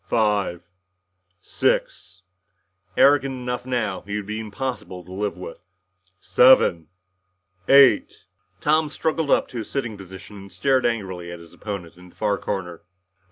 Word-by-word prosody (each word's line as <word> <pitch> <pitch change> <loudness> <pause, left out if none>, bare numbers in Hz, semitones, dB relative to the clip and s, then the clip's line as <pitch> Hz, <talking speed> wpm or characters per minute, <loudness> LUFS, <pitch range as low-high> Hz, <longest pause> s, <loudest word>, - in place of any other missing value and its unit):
"Five 105 -6 +1 0.8
six 95 +2 -1 0.3
" 95 -1 -41
Arrogant 140 -1 +4
enough 125 0 -4
now, 110 -7 -1
he 105 +1 -6
would 105 -1 -3
be 105 +2 -4
impossible 110 -5 -5
to 90 - -13
live 100 0 -3
with. 90 -2 -9 0.6
"Seven 90 -12 +5 0.8
eight 140 0 +5 0.2
" 90 +4 -42
Tom 155 0 +2
struggled 160 0 -1
up - - +3
to 120 - -5
a - - -4
sitting 115 -2 -4
position 95 +2 -11
and 100 0 -12
stared 135 -3 +2
angrily 95 -7 -4
at 85 - -7
his 85 -1 -15
opponent 90 -5 -7
in 90 0 -15
the - - -23
far 105 -2 0
corner. 90 -4 -4
105 Hz, 150 wpm, -23 LUFS, 95-125 Hz, 0.8 s, Seven